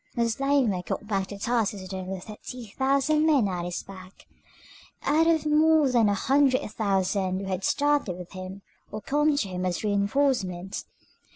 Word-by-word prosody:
Moslemah 240 -3 +1
got 210 - -4
back 195 -3 -1
to 200 - -8
Tarsus 225 -1 0
with 185 - -8
only 190 0 -5
thirty 220 +4 -9
thousand 275 +3 +2
men 280 -9 +4
at 180 -2 -3
his 175 0 -4
back, 185 -1 -13 0.8
out 320 +2 +3
of 320 -2 +2
more 305 -2 +4
than 230 -4 +4
a 200 - +1
hundred 270 +3 +2
thousand 195 -2 0
who - - -5
had 190 0 -3
started 290 -11 +1
with 180 -1 -10
him 185 +1 -8 0.3
or 215 - -4
come 295 +5 +1
to 220 - 0
him 180 -1 -4
as 180 +1 -2
reinforcements. 200 -3 0
210 Hz, 165 wpm, -26 LUFS, 190-275 Hz, 0.8 s, men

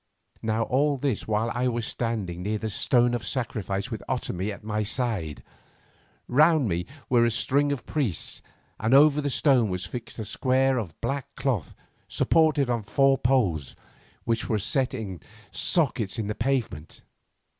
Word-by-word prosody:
Now 110 +1 0
all 140 +5 +1
this 130 -5 -2
while 110 +2 0
I 125 +1 0
was 120 -2 -1
standing 105 -9 -3
near 105 +3 -1
the 110 +1 -4
stone 120 +3 +2
of 120 -2 -2
sacrifice 105 -2 -3
with 110 - -4
Otomie 105 -6 -2
at 100 - -9
my 105 0 -1
side. 105 - -2 0.8
Round 150 +1 +4
me 85 -1 -2 0.2
were 120 -2 +4
a 120 - +4 0.2
ring 145 +1 +3
of 140 -5 -3
priests, 135 - -1 0.4
and 115 +5 +3
over 150 +1 +6
the 145 - -1
stone 130 -5 +3
was 90 0 -3
fixed 115 +6 -7
a 110 - -4
square 130 +4 +2
of 90 -9 -7
black 135 +3 -3
cloth 115 - -2 0.3
supported 155 -3 +3
upon 120 -2 0
four 135 +7 +3
poles, 100 - +1 0.5
which 115 0 -1
were 110 - +2
set 130 +6 0
in 100 -7 -5 0.3
sockets 125 - +1
in 110 - -2
the 105 - -2
pavement. 115 - -2
115 Hz, 160 wpm, -26 LUFS, 105-135 Hz, 0.8 s, over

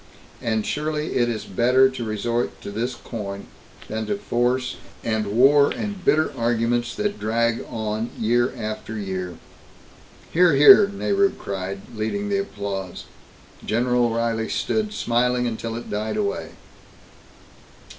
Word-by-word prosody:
And 110 -2 0
surely 150 +1 -2
it 120 -1 +2
is 110 -2 -3
better 125 +6 +4
to 130 -2 -5
resort 115 +2 -2
to - - -6
this 120 +4 -2
coin 100 -5 -6 0.4
than 110 0 -3
to 205 - -1
force 125 -7 0 0.3
and 110 -2 -1
war 135 +7 +5
and 205 -4 -4
bitter 155 -2 +2
arguments 120 0 0
that 205 0 -2
drag 115 +1 0
on 110 0 -3
year 120 +3 +2
after 110 0 -5
year." 95 -3 -4 1.0
"Hear! 170 -3 +5
Hear!" 200 +9 +9
Nehru 200 0 +1
cried, 95 0 -5
leading 200 - -2
the 200 -1 +1
applause. 100 - -5 0.6
General 125 +2 +2
O'Reilly 115 -1 -1
stood 215 -1 -1
smiling 125 - +1
until 115 -1 -3
it 120 - -7
died 105 +1 -2
away. 200 -2 -2
120 Hz, 130 wpm, -23 LUFS, 110-145 Hz, 1.0 s, Hear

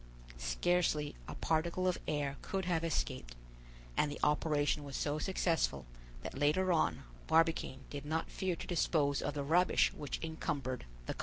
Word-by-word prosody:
Scarcely 150 - +1
a - - -6
particle 170 +3 +1
of 180 - +1
air 145 -2 -1
could 190 -2 -2
have 170 -2 +1
escaped, - - -2 0.6
and 150 - +2
the - - -6
operation 150 0 +2
was 140 -2 -5
so 150 +1 0
successful 165 - +1 0.4
that - - -5
later 155 +7 +3
on 90 - +1 0.2
Barbicane 165 -5 +2
did 145 -1 -5
not 160 +2 -2
fear 185 -2 -1
to - - -7
dispose 150 -4 +2
of 145 - -2
the 145 - -1
rubbish 175 +5 +4
which 145 -3 -4
encumbered 140 - -3 0.2
the - - -2
car. - - -17
150 Hz, 160 wpm, -35 LUFS, 140-170 Hz, 0.6 s, rubbish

